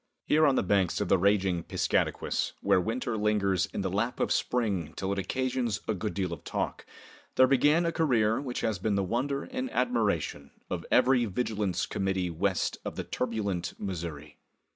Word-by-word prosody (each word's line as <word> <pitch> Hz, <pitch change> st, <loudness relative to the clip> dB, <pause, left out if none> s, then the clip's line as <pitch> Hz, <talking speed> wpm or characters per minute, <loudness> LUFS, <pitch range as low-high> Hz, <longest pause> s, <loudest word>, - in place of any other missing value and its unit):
Here 155 Hz, +1 st, +4 dB
on 135 Hz, -, +3 dB
the -, -, +2 dB
banks 95 Hz, -2 st, +2 dB
of -, -, -1 dB
the -, -, +5 dB
raging 95 Hz, -2 st, +2 dB
Piscataquis, -, -, 0 dB
where 90 Hz, -, +3 dB
winter 115 Hz, +3 st, -2 dB
lingers 100 Hz, -4 st, +1 dB
in -, -, -4 dB
the 95 Hz, -, -1 dB
lap 115 Hz, +6 st, -1 dB
of -, -, 0 dB
spring 100 Hz, -11 st, 0 dB
till 95 Hz, 0 st, -2 dB
it 100 Hz, -, -1 dB
occasions 125 Hz, +1 st, -1 dB
a 110 Hz, -, +1 dB
good 105 Hz, +2 st, -4 dB
deal 95 Hz, -3 st, -1 dB
of 85 Hz, -, -8 dB
talk, -, -, -3 dB, 0.5 s
there 130 Hz, -, +7 dB
began 145 Hz, +6 st, +4 dB
a 170 Hz, -, +1 dB
career 120 Hz, -8 st, +2 dB
which 130 Hz, -3 st, -4 dB
has 110 Hz, -5 st, -1 dB
been 105 Hz, +2 st, 0 dB
the 100 Hz, -, +1 dB
wonder 135 Hz, +8 st, -1 dB
and 260 Hz, 0 st, -4 dB
admiration 105 Hz, -, 0 dB, 0.2 s
of -, -, -3 dB
every 125 Hz, -2 st, +4 dB
vigilance 100 Hz, -4 st, -1 dB
committee 95 Hz, -2 st, -1 dB
west 80 Hz, -, -1 dB
of -, -, -5 dB
the -, -, -3 dB
turbulent 100 Hz, -8 st, -2 dB
Missouri. 80 Hz, -6 st, -6 dB
105 Hz, 180 wpm, -29 LUFS, 95-125 Hz, 0.5 s, there